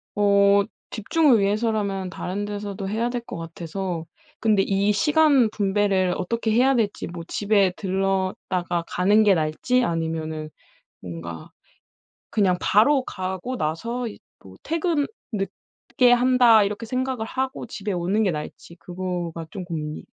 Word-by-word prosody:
어 200 Hz, 0 st, +4 dB, 0.3 s
집중을 265 Hz, +3 st, +3 dB
위해서라면 200 Hz, -2 st, 0 dB
다른 185 Hz, +3 st, -4 dB
데서도 205 Hz, -1 st, -5 dB
해야 225 Hz, +3 st, 0 dB
될 245 Hz, 0 st, -3 dB
것 235 Hz, -3 st, -8 dB
같아서 165 Hz, +1 st, -5 dB, 0.3 s
근데 215 Hz, -3 st, +3 dB
이 200 Hz, +1 st, +1 dB
시간 285 Hz, +2 st, +4 dB
분배를 195 Hz, -3 st, +1 dB
어떻게 230 Hz, +3 st, -1 dB
해야 255 Hz, +4 st, +4 dB
될지 215 Hz, -4 st, -1 dB
뭐 170 Hz, 0 st, -7 dB
집에 200 Hz, -2 st, +2 dB
들렀다가 190 Hz, -2 st, -1 dB
가는 205 Hz, +4 st, +3 dB
게 205 Hz, -2 st, +5 dB
나을지? 160 Hz, +11 st, +1 dB
아니면은 160 Hz, -4 st, -3 dB, 0.5 s
뭔가 85 Hz, -2 st, -8 dB, 0.8 s
그냥 190 Hz, -4 st, +3 dB
바로 255 Hz, +7 st, +4 dB
가고 190 Hz, +6 st, -4 dB
나서 230 Hz, +11 st, -2 dB
이 215 Hz, -, -9 dB, 0.2 s
뭐 95 Hz, -1 st, -13 dB
'퇴근 325 Hz, -2 st, 0 dB, 0.2 s
늦게 220 Hz, +4 st, -1 dB
한다.' 245 Hz, -3 st, +5 dB
이렇게 205 Hz, +3 st, -3 dB
생각을 255 Hz, -1 st, -2 dB
하고 260 Hz, +3 st, -3 dB
집에 210 Hz, -2 st, -5 dB
오는 185 Hz, +4 st, 0 dB
게 200 Hz, -, +2 dB
나을지. 155 Hz, +2 st, -7 dB
그거가 175 Hz, -2 st, -5 dB
좀 185 Hz, +1 st, -7 dB
고민이 155 Hz, -3 st, -5 dB
200 Hz, 280 characters per minute, -24 LUFS, 180-230 Hz, 0.8 s, 게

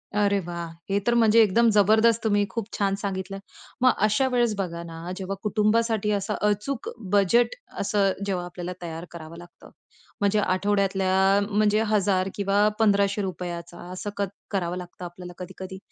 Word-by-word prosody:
अरे 200 Hz, -1 st, +3 dB
वाह! 170 Hz, -1 st, -5 dB, 0.2 s
हे 200 Hz, +1 st, +2 dB
तर 240 Hz, -, +4 dB
म्हणजे 230 Hz, -1 st, +6 dB
एकदम 230 Hz, +3 st, +4 dB
जबरदस्त 220 Hz, +3 st, +4 dB
तुम्ही 205 Hz, -2 st, +2 dB
खूप 230 Hz, +1 st, -3 dB
छान 195 Hz, -1 st, +1 dB
सांगितलं. 195 Hz, -1 st, -4 dB, 0.4 s
मग 255 Hz, -, +6 dB, 0.2 s
अशा 215 Hz, +6 st, +2 dB
वेळेस 240 Hz, -3 st, +2 dB
बघा 170 Hz, -3 st, -3 dB
ना, 165 Hz, +1 st, -7 dB
जेव्हा 195 Hz, 0 st, -4 dB
कुटुंबासाठी 215 Hz, 0 st, +1 dB
असं 205 Hz, +1 st, -1 dB
अचूक 225 Hz, +5 st, -2 dB, 0.2 s
बजेट 220 Hz, -, +3 dB, 0.2 s
असं 200 Hz, -1 st, +2 dB
जेव्हा 185 Hz, -3 st, -2 dB
आपल्याला 175 Hz, 0 st, -6 dB
तयार 165 Hz, 0 st, -6 dB
करावं 165 Hz, 0 st, -9 dB
लागतं. 175 Hz, 0 st, -14 dB, 0.5 s
म्हणजे 205 Hz, +1 st, +3 dB
आठवड्यातल्या 195 Hz, 0 st, +2 dB
म्हणजे 210 Hz, +1 st, +2 dB
₹1000 195 Hz, -3 st, +2 dB
किंवा 200 Hz, +1 st, +2 dB
₹1500 200 Hz, -1 st, +3 dB
रुपयाचा 175 Hz, -2 st, -5 dB
असं 185 Hz, +3 st, -5 dB
कत 200 Hz, -1 st, 0 dB, 0.2 s
करावं 180 Hz, -3 st, -1 dB
लागतं 180 Hz, 0 st, -8 dB
आपल्याला 175 Hz, 0 st, -9 dB
कधी-कधी. 190 Hz, +1 st, -8 dB
200 Hz, 150 wpm, -25 LUFS, 180-210 Hz, 0.5 s, म्हणजे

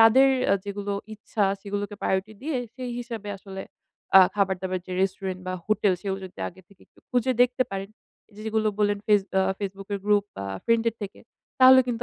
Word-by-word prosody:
তাদের 245 Hz, +5 st, +7 dB, 0.2 s
অ্যা -, -, +4 dB
যেগুলো 205 Hz, 0 st, -3 dB, 0.2 s
ইচ্ছা 210 Hz, 0 st, -1 dB, 0.2 s
সেগুলোকে 205 Hz, 0 st, -3 dB
প্রায়োরিটি 190 Hz, +3 st, 0 dB
দিয়ে 300 Hz, -1 st, -1 dB, 0.2 s
সেই 255 Hz, -2 st, -5 dB
হিসাবে 230 Hz, -4 st, -6 dB
আসলে 195 Hz, 0 st, -8 dB, 0.6 s
আ -, -, +11 dB
খাবার-দাবার 190 Hz, -2 st, 0 dB
যে 185 Hz, -, -6 dB
রেস্টুরেন্ট 190 Hz, -1 st, -2 dB
বা 185 Hz, -, -2 dB
হোটেল 215 Hz, -2 st, +3 dB
সেগুলো 195 Hz, -1 st, -3 dB
যদি 185 Hz, -, -17 dB
আগে 185 Hz, -, -14 dB
থেকে 200 Hz, -3 st, -22 dB
একটু -, -, -30 dB
খুঁজে 250 Hz, 0 st, +2 dB
দেখতে 250 Hz, +1 st, +2 dB
পারেন 195 Hz, 0 st, -4 dB, 0.4 s
এইযে 210 Hz, 0 st, -13 dB
যেগুলো 220 Hz, 0 st, +1 dB
বললেন 205 Hz, -1 st, +2 dB
ফেস 210 Hz, -1 st, +5 dB, 0.2 s
আ -, -, +5 dB, 0.2 s
Facebook 195 Hz, -1 st, -5 dB
এর -, -, -2 dB
গ্রুপ 205 Hz, -1 st, +3 dB
বা 100 Hz, -, -4 dB, 0.2 s
ফ্রেন্ডের 230 Hz, -1 st, +2 dB
থেকে, 195 Hz, -, -7 dB, 0.4 s
তাহলে 260 Hz, 0 st, +9 dB
কিন্তু 240 Hz, -1 st, -2 dB
205 Hz, 185 wpm, -26 LUFS, 195-225 Hz, 0.6 s, আ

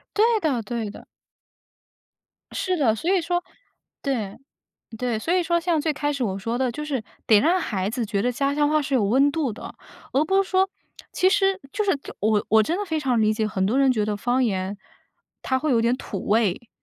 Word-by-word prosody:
对 425 Hz, -, +4 dB, 0.2 s
的， 275 Hz, -, 0 dB
对 225 Hz, 0 st, -4 dB
的。 -, -, -12 dB, 1.5 s
是 375 Hz, -2 st, -1 dB
的， 255 Hz, -9 st, +3 dB
所 325 Hz, -, -2 dB
以 375 Hz, -, +3 dB
说 350 Hz, +1 st, -1 dB, 0.6 s
对， 225 Hz, -8 st, -2 dB, 0.6 s
对。 245 Hz, -2 st, -1 dB
所 325 Hz, +10 st, -1 dB
以 365 Hz, -, +3 dB
说 340 Hz, 0 st, +1 dB
像 335 Hz, -2 st, +1 dB
最 310 Hz, +1 st, 0 dB
开 290 Hz, 0 st, -1 dB
始 275 Hz, -3 st, -2 dB
我 195 Hz, -3 st, -2 dB
说 230 Hz, +4 st, -3 dB
的， 260 Hz, -1 st, +1 dB
就 300 Hz, +6 st, -5 dB
是 275 Hz, -6 st, -2 dB, 0.2 s
得 215 Hz, -2 st, +6 dB
让 355 Hz, -, +3 dB
孩 195 Hz, -, -2 dB
子 235 Hz, +1 st, -2 dB
觉 200 Hz, -1 st, -1 dB
得 245 Hz, -, +1 dB
家 275 Hz, +3 st, 0 dB
乡 295 Hz, 0 st, +2 dB
话 305 Hz, 0 st, +2 dB
是 275 Hz, -1 st, -2 dB
有 240 Hz, -5 st, +3 dB
温 265 Hz, +8 st, +4 dB
度 290 Hz, -5 st, -1 dB
的， -, -, -9 dB, 0.4 s
而 280 Hz, +3 st, +3 dB
不 385 Hz, +4 st, +3 dB
是 385 Hz, -, -10 dB
说 380 Hz, 0 st, +3 dB, 0.4 s
其 370 Hz, -, +3 dB
实 390 Hz, -1 st, +2 dB
就 425 Hz, -, -1 dB
是 385 Hz, -8 st, +1 dB, 0.2 s
我 210 Hz, 0 st, +2 dB
我 220 Hz, 0 st, +5 dB
真 325 Hz, +11 st, -1 dB
的 415 Hz, -, -2 dB
非 320 Hz, -5 st, -2 dB
常 255 Hz, -5 st, +1 dB
理 215 Hz, 0 st, +3 dB
解， 215 Hz, 0 st, -1 dB
很 190 Hz, -3 st, -1 dB
多 235 Hz, +7 st, +1 dB
人 275 Hz, -1 st, +4 dB
觉 215 Hz, -4 st, 0 dB
得 210 Hz, 0 st, -2 dB
方 245 Hz, +5 st, +1 dB
言 195 Hz, -2 st, -2 dB, 0.7 s
它 260 Hz, -, 0 dB
会 305 Hz, +3 st, -1 dB
有 235 Hz, -3 st, +3 dB
点 235 Hz, +2 st, +2 dB
土 200 Hz, -7 st, -6 dB
味， 215 Hz, +1 st, +1 dB
260 Hz, 235 characters per minute, -24 LUFS, 220-320 Hz, 1.5 s, 得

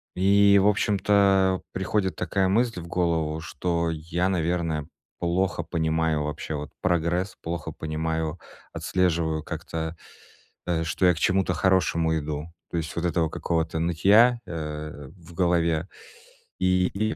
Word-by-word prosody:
И 100 Hz, +2 st, +5 dB
в 100 Hz, -, +4 dB
общем-то 100 Hz, -2 st, +3 dB
приходит 95 Hz, 0 st, -1 dB
такая 95 Hz, +2 st, 0 dB
мысль 115 Hz, 0 st, +1 dB
в 85 Hz, -, -9 dB
голову, 80 Hz, -3 st, 0 dB
что 85 Hz, +1 st, -1 dB
я, 85 Hz, +3 st, -1 dB
наверное, 85 Hz, -4 st, -1 dB, 0.3 s
плохо 90 Hz, 0 st, 0 dB
понимаю 80 Hz, -2 st, 0 dB
вообще 75 Hz, +1 st, -4 dB
вот 75 Hz, +1 st, -6 dB
прогресс, 90 Hz, +2 st, 0 dB
плохо 85 Hz, -1 st, -4 dB
понимаю, 80 Hz, +1 st, -3 dB, 0.3 s
отслеживаю 85 Hz, -4 st, 0 dB
как-то, 80 Hz, 0 st, -5 dB, 0.7 s
э, 80 Hz, -2 st, 0 dB
что 90 Hz, +3 st, 0 dB
я 90 Hz, -, +5 dB
к -, -, -6 dB
чему-то 95 Hz, -1 st, +2 dB
хорошему 85 Hz, -3 st, +2 dB
иду. 75 Hz, 0 st, -4 dB, 0.2 s
То -, -, -2 dB
есть 80 Hz, -1 st, -4 dB
вот 85 Hz, -, -2 dB
этого 85 Hz, -2 st, +1 dB
какого-то 80 Hz, -1 st, -1 dB
нытья, 100 Hz, +9 st, +4 dB
э, 75 Hz, -4 st, -6 dB
в 85 Hz, 0 st, -15 dB
голове 85 Hz, -1 st, +1 dB, 0.7 s
и, 90 Hz, 0 st, +3 dB
и 110 Hz, +2 st, -1 dB
85 Hz, 135 wpm, -25 LUFS, 80-95 Hz, 0.7 s, И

